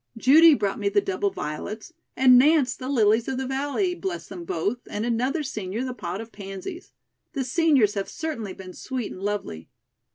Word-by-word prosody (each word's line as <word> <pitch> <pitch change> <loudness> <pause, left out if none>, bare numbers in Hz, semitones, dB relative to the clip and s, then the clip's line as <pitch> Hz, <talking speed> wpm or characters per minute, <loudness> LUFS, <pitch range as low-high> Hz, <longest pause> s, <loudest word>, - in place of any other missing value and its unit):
Judy 300 +6 +7
brought 205 -3 -2
me 200 -1 +1
the 205 +1 +3
double 195 0 -1
violets 210 - -6 0.2
and 255 -1 +7
Nance 290 -1 +4
the 255 - -6
lilies 225 -3 +3
of 265 - -2
the 265 - -2
valley, 285 +8 -1
bless 370 0 -5
them 180 -3 -8
both, 200 +9 -2
and 210 +2 -3
another 255 +7 0
senior 215 -3 -4
the 255 - -4
pot 185 -5 -5
of 225 +1 -8
pansies. 195 - -8 0.4
The 270 - -1
seniors 260 - +3
have 195 -1 -3
certainly 295 - -4
been 185 -1 -10
sweet 255 +1 -5
and 185 - -9
lovely." 200 - -4
230 Hz, 185 wpm, -25 LUFS, 200-275 Hz, 0.4 s, Judy